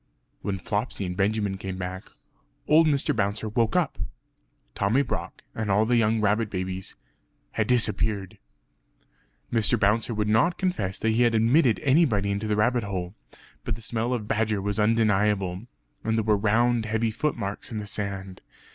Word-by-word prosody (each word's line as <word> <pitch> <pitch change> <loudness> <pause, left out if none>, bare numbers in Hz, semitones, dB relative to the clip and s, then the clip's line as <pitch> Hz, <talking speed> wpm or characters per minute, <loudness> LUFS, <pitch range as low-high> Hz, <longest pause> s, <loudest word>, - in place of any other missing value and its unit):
When 100 -1 -2
Flopsy 105 +2 -2
and 90 0 -4
Benjamin 100 0 0
came 95 -1 -5
back 95 +1 -6 0.6
old 160 +1 +5
Mr. 140 -4 +1
Bouncer 105 +1 -1
woke 110 0 0
up. - - 0 0.7
Tommy 110 - +2
Brock 125 - -5
and 110 -2 -3
all 105 +3 +3
the 120 +2 +2
young 115 -1 +2
rabbit 105 +1 +1
babies 95 0 -4 0.6
had - - -1
disappeared! 110 -5 0 1.1
Mr. 110 -3 +2
Bouncer 110 +3 +1
would 105 0 0
not 115 +12 +3
confess 110 - -1
that 110 - 0
he 115 +2 +2
had 120 -1 +3
admitted 115 +2 +3
anybody 130 -9 +3
into 100 +2 -2
the 105 - +1
rabbit 120 +4 +2
hole. 95 -3 -4 0.5
But - - -2
the 115 - -11
smell 115 +3 -2
of 115 -4 -2
badger 110 -1 0
was 100 +2 -2
undeniable; 105 -2 +1 0.4
and 110 0 0
there 110 - +1
were 105 0 +3
round 115 +2 +2
heavy 110 +1 0
footmarks 110 -4 -3
in 110 - -4
the 105 - -4
sand. 100 -2 -5
105 Hz, 165 wpm, -26 LUFS, 100-115 Hz, 1.1 s, old